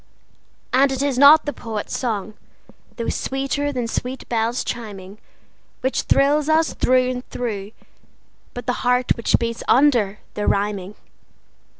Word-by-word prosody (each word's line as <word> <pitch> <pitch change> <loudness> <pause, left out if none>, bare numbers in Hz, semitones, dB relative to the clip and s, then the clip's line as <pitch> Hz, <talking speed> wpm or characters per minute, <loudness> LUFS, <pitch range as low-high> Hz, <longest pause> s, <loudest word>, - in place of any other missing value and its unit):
And 270 +2 +4
it 265 +1 -1
is 275 -3 0
not 290 +3 +8
the 290 - -3
poet's 220 -3 -5
song, 215 -4 -3 0.6
though 230 - -3
sweeter 275 +2 -2
than 250 -4 -3
sweet 250 +3 -4
bells 230 +1 0
chiming, 205 -3 -7 0.6
Which 260 - 0
thrills 290 +2 +2
us 320 +1 +2
through 255 0 +2
and 250 0 -7
through, 210 -4 -4 0.8
but 245 - -6
the 250 - 0
heart 250 0 +2
which 230 - +2
beats 230 0 -3
under 240 -7 +3 0.2
the 210 - -3
rhyming. 200 -1 -1
245 Hz, 135 wpm, -21 LUFS, 215-270 Hz, 0.8 s, not